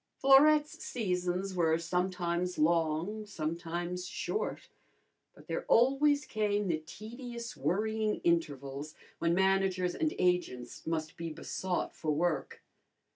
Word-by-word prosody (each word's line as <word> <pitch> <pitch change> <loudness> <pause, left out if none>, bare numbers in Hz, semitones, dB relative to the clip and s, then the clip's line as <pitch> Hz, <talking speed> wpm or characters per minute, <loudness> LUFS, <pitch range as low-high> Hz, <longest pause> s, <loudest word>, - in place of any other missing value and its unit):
Florette's 295 +3 +5
seasons 185 -3 -1
were 165 -3 +2
sometimes 180 0 -1
long, 165 +6 +1
sometimes 170 +1 -3
short; 425 - -3 0.7
but - - -16
there - - -3
always 285 +4 +4
came 210 -2 0
the 165 -3 0
tedious 235 +6 -8
worrying 215 +9 0
intervals 145 -3 -1 0.2
when 170 0 +2
managers 190 -1 +2
and 315 -1 -1
agents 180 -11 -1
must 160 +1 -2
be 170 0 -4
besought 180 +3 -3
for 155 - -4
work. 160 +2 -1
180 Hz, 110 wpm, -32 LUFS, 165-215 Hz, 0.7 s, Florette's